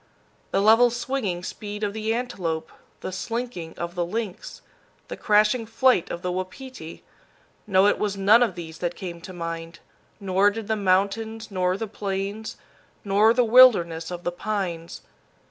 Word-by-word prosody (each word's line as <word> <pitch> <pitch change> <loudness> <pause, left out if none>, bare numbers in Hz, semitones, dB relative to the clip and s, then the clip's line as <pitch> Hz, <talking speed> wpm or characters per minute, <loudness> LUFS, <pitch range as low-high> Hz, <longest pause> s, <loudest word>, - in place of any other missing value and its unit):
The 195 - +1
level 225 +3 +6
swinging 235 -7 -3
speed 210 +2 -6
of 205 -1 -1
the 220 0 -2
antelope, 180 -10 -3 0.3
the - - -5
slinking 190 -3 -5
of 170 0 -4
the 175 -1 -1
lynx, 205 +2 -5 0.5
the - - -4
crashing 215 +2 +2
flight 245 -4 +2
of 170 - -6
the 180 - -1
wapiti 185 - -7 0.6
no, 190 -1 +4
it 205 - +3
was 205 -1 -1
none 205 +5 +5
of 225 -7 +1
these 165 -2 -8
that 175 -1 -2
came 170 -2 -7
to 185 - -9
mind; 165 -1 -6 0.4
nor 195 0 +3
did 215 0 -6
the 220 - +1
mountains 205 +3 0
nor 185 -1 0
the 225 - -3
plains, 200 +1 -4 0.5
nor 205 +3 +4
the 245 +1 +3
wilderness 200 -10 +5
of 175 -1 -6
the 175 - -1
pines. 175 -4 -4
200 Hz, 160 wpm, -24 LUFS, 175-220 Hz, 0.6 s, level